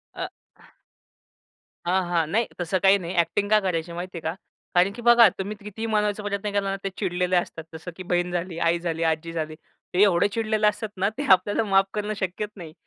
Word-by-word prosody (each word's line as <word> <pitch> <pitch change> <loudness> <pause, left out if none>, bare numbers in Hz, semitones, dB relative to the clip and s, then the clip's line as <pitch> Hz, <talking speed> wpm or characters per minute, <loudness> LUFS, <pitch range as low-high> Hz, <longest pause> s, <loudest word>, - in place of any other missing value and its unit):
अ - - -3 1.6
हां, 185 +2 +2
हां. 170 -2 +2
नाही, 230 +2 +2
तसं 175 +2 0
काही 195 +1 +6
नाही, 175 -1 -5
अ‍ॅक्टिंग 200 +4 +1
का 215 0 +6
करायची 170 -3 -2
माहितीये 175 0 -6
का 160 +1 -2 0.4
कारण 180 +3 +4
की 240 - -9
बघा, 240 -1 +8
तुम्ही 200 +2 -3
कितीही 210 +2 -5
मानवायचा 210 -1 0
प्रयत्न 205 0 -2
केला 200 -1 0
ना, 195 - -1
ते 195 - -1
चिडलेले 180 -2 0
असतात. 175 -2 -1
जसं 160 +3 -7
की 185 - -6
बहीण 175 0 0
झाली, 175 -1 -3
आई 170 0 +2
झाली, 165 -1 -2
आजी 160 +1 -2
झाली. 155 -1 -3 0.4
ते 185 - +3
एवढे 190 -1 +4
चिडलेले 215 0 +1
असतात 210 +1 -1
ना, 195 +2 +2
ते 285 - -2
आपल्याला 205 +4 +4
माफ 195 -2 +4
करणं 210 0 -2
शक्यच 190 +3 -3
नाही. 165 -5 -10
190 Hz, 200 wpm, -25 LUFS, 175-210 Hz, 1.6 s, बघा